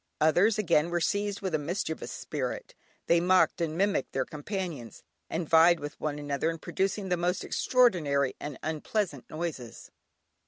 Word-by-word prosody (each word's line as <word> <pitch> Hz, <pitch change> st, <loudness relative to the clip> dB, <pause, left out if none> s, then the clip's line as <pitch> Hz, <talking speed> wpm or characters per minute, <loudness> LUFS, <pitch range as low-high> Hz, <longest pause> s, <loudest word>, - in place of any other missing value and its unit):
Others 180 Hz, +8 st, +4 dB
again 170 Hz, -5 st, +2 dB
were 175 Hz, 0 st, 0 dB
seized 200 Hz, +4 st, -1 dB
with 190 Hz, -3 st, -3 dB
a 155 Hz, -, +2 dB
mischievous 160 Hz, +1 st, -3 dB
spirit; -, -, -4 dB, 0.3 s
they 170 Hz, -, +4 dB
mocked 185 Hz, 0 st, +3 dB
and 160 Hz, -1 st, -1 dB
mimicked 195 Hz, -6 st, 0 dB
their 130 Hz, -1 st, 0 dB
companions, 155 Hz, -, -6 dB, 0.3 s
and 165 Hz, 0 st, -3 dB
vied 165 Hz, +2 st, +6 dB
with 145 Hz, 0 st, -7 dB
one 150 Hz, -1 st, -2 dB
another 145 Hz, +2 st, -1 dB
in 165 Hz, -, -3 dB
producing 195 Hz, +4 st, -2 dB
the 180 Hz, -, +1 dB
most 175 Hz, +2 st, 0 dB
extraordinary 155 Hz, -, +2 dB
and 145 Hz, -2 st, -6 dB
unpleasant 155 Hz, -, -2 dB
noises. 155 Hz, -8 st, -6 dB
170 Hz, 155 wpm, -29 LUFS, 150-190 Hz, 0.3 s, vied